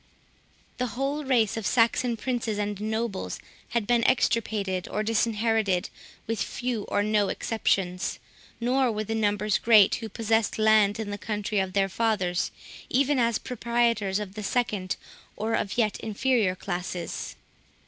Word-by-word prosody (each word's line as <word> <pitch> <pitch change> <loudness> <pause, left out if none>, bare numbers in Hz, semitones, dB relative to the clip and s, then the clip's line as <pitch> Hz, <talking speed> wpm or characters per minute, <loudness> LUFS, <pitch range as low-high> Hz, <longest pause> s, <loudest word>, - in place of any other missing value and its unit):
The 250 - 0
whole 280 +3 -1
race 235 -6 +2
of 225 - -4
Saxon 235 0 +2
princes 235 -2 -2
and 205 -1 -2
nobles 220 -1 -2 0.3
had 235 -3 0
been 235 +1 +2
extirpated 205 -7 +1
or 215 - -2
disinherited, 220 -3 +1 0.3
with 225 0 -2
few 245 -4 -2
or 205 - 0
no 210 -1 +2
exceptions; 190 -5 -1 0.4
nor 250 +1 +2
were 215 0 -2
the 220 - -3
numbers 210 -1 +1
great 220 -4 +6
who 225 -2 -3
possessed 225 0 0
land 215 -1 +4
in 210 -2 -3
the 205 - -5
country 210 0 -2
of 190 -1 -1
their 195 0 +2
fathers, 190 -4 0 0.4
even 275 +1 +2
as 230 -2 +2
proprietors 235 -5 0
of 205 -2 -5
the 215 - -6
second, 205 -4 -1 0.4
or 220 +1 -2
of 200 - -1
yet 215 -4 +1
inferior 220 -3 +1
classes. 180 -2 -4
220 Hz, 145 wpm, -27 LUFS, 205-235 Hz, 0.4 s, great